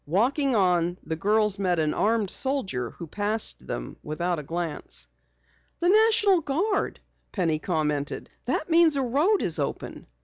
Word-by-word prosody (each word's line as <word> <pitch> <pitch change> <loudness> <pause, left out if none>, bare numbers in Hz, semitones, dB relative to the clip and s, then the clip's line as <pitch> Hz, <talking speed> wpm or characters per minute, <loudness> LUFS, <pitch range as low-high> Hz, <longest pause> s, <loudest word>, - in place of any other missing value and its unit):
Walking 255 - +1
on, 180 -3 +2
the 160 - -3
girls 210 +3 +1
met 180 -3 +1
an 155 -1 +1
armed 215 -3 +1
soldier 195 - +1
who 170 - -9
passed 205 - -2
them - - -5
without 170 +2 -2
a - - -4
glance. 155 - -5 0.7
"The 350 - +1
National 415 -3 +4
Guard," 360 +9 -1 0.3
Penny 165 -6 0
commented. 150 -4 -2 0.2
"That 260 +5 -1
means 330 -2 +4
a 275 - 0
road 300 - +2
is 165 -2 +1
open." 140 - -4
200 Hz, 145 wpm, -26 LUFS, -, 0.7 s, National